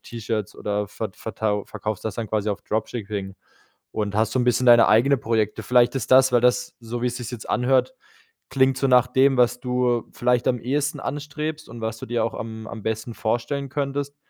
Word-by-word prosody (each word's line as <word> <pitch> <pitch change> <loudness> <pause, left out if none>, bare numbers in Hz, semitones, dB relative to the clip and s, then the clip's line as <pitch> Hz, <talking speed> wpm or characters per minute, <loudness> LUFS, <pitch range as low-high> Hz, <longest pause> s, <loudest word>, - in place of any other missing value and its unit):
T-Shirts 110 -3 -4
oder 105 0 -2
vert 105 -1 -6
vertau 105 -2 -2
verkaufst 110 -2 -5
das 110 -2 -3
dann 115 - -3
quasi 105 0 0
auf 100 -1 -4
Dropshipping 105 -3 -4 0.6
und 105 -2 -2
hast 110 +1 +1
so - - 0
'n 125 - +2
bisschen 125 +1 +2
deine 120 -1 +7
eigene 120 +7 +5
Projekte. 110 -2 -1
Vielleicht 125 +2 +3
ist 135 - -3
das 130 0 +7
weil 120 -1 +4
das, 125 0 +2
so 120 +1 -5
wie - - +1
es 125 0 -2
sich's 120 -1 -6
jetzt 120 -3 -8
anhört, 130 - +2 0.6
klingt 130 -1 +3
so 135 - +1
nach 125 -1 +5
dem, 135 +1 +3
was 125 0 +3
du 125 -2 0
vielleicht 125 -1 +1
am 125 -2 +1
ehesten 145 +5 -1
anstrebst 150 +2 -5
und 120 0 -9
was 110 0 -3
du - - -7
dir 120 0 -1
auch - - -3
am 110 0 -7
am 110 -1 -8
besten 110 +2 -3
vorstellen 130 +6 -2
könntest 140 +1 -3
120 Hz, 205 wpm, -23 LUFS, 110-130 Hz, 0.6 s, deine